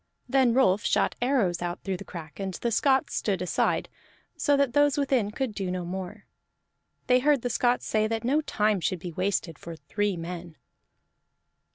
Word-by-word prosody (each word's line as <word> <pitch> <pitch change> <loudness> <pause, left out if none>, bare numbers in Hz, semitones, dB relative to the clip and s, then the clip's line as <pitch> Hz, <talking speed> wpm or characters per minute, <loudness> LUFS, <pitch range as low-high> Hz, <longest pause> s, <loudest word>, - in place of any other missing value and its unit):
Then 255 -2 +3
Rolf 210 -5 +3
shot - - +2
arrows 235 -10 +1
out 175 0 -4
through 190 -2 -2
the 200 - -8
crack, 165 -4 -9
and 190 -2 -3
the 235 - -2
Scots 265 +4 +2
stood 195 -4 0
aside, 180 -1 0 0.5
so 285 -1 +2
that 280 -3 +1
those 290 0 +3
within 265 -7 +1
could 245 +1 -3
do 195 -2 -3
no 180 -1 -3
more. 190 +3 -6 0.8
They 250 0 +4
heard 285 -1 +2
the 245 - -1
Scots 245 +2 +1
say 215 0 +1
that 225 +1 -2
no 280 +6 +2
time 210 -8 +1
should 185 - 0
be 175 0 -7
wasted 185 -3 -2
for 170 -1 -8
three 205 +3 -2
men. 170 0 -7
210 Hz, 180 wpm, -27 LUFS, 180-255 Hz, 0.8 s, They